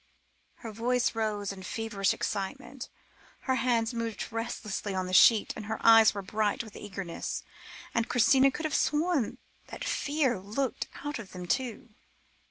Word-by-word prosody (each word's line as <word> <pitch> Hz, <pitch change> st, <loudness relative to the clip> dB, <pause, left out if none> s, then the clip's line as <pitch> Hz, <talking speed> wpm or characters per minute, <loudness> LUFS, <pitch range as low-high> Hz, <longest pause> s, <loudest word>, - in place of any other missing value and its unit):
Her 225 Hz, -, -8 dB
voice 245 Hz, +3 st, +1 dB
rose 215 Hz, -3 st, -1 dB
in 190 Hz, -, -10 dB
feverish 200 Hz, 0 st, -1 dB
excitement, 245 Hz, +6 st, -4 dB, 0.5 s
her 260 Hz, -, 0 dB
hands 235 Hz, -1 st, +1 dB
moved 230 Hz, -2 st, -4 dB
restlessly 215 Hz, -3 st, -3 dB
on 185 Hz, 0 st, -1 dB
the 185 Hz, -, -5 dB
sheet, 215 Hz, +3 st, +6 dB
her 215 Hz, +1 st, -4 dB
eyes 225 Hz, -2 st, +8 dB
were 200 Hz, -, -4 dB
bright 210 Hz, +3 st, 0 dB
with 220 Hz, -3 st, -13 dB
eagerness, 195 Hz, -4 st, -5 dB, 0.5 s
and 230 Hz, 0 st, 0 dB
Christina 265 Hz, +3 st, +5 dB
could 310 Hz, +3 st, -5 dB
have 310 Hz, -, -2 dB
sworn 300 Hz, -5 st, +1 dB, 0.3 s
that -, -, -7 dB
fear 280 Hz, -6 st, 0 dB
looked 220 Hz, +7 st, -2 dB, 0.2 s
out 290 Hz, -3 st, -3 dB
of 210 Hz, -5 st, -10 dB
them, 180 Hz, -1 st, -6 dB
too. 250 Hz, +4 st, -2 dB
225 Hz, 150 wpm, -29 LUFS, 205-255 Hz, 0.5 s, eyes